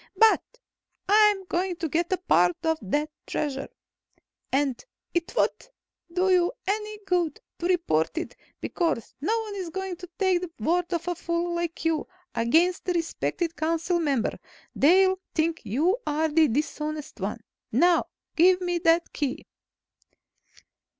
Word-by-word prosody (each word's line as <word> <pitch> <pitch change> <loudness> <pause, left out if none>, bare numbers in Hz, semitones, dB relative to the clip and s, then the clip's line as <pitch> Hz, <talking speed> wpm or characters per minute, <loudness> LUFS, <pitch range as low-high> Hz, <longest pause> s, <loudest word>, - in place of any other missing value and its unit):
"But 445 +2 +6 0.7
I'm 415 -1 +5
going 360 +1 -1
to 335 -1 -3
get 345 +4 -1
part 175 0 +4
of 320 -1 +1
that 295 +10 -1 0.2
Treasure. 275 -2 -2 0.8
And 270 -2 0 0.3
it 345 +6 -2
won't - - 0 0.4
do 370 +2 +2
you 355 -1 +3
any 425 +2 -2
good 350 -5 0 0.2
to 345 - -1
report 335 - +1
it, 335 - -4 0.2
because 330 - -1
no 445 +10 +1
one 430 -2 -6
is 365 -3 -4
going 380 +1 -4
to 360 -1 -10
take 375 -3 +2
the 360 - -4
word 345 +9 0
of 340 -1 -2
a 355 - +1
fool 340 0 -2
like 340 -1 -3
you, 320 -2 +1 0.3
against 330 +11 +2
a - - +2
respected 335 0 -2
council 330 +3 0
member. 280 -8 0 0.3
They'll 375 +5 +4 0.2
think 330 0 +1
you 325 - +2
are 310 +2 +1
the 310 +1 +4
dishonest 300 +3 -3
one. - - -4 0.3
Now, 350 -1 +4 0.3
give 360 +2 +5
me 355 -1 -1
that 330 +1 +2
Key!" 280 -3 -2
340 Hz, 145 wpm, -26 LUFS, 310-365 Hz, 0.8 s, But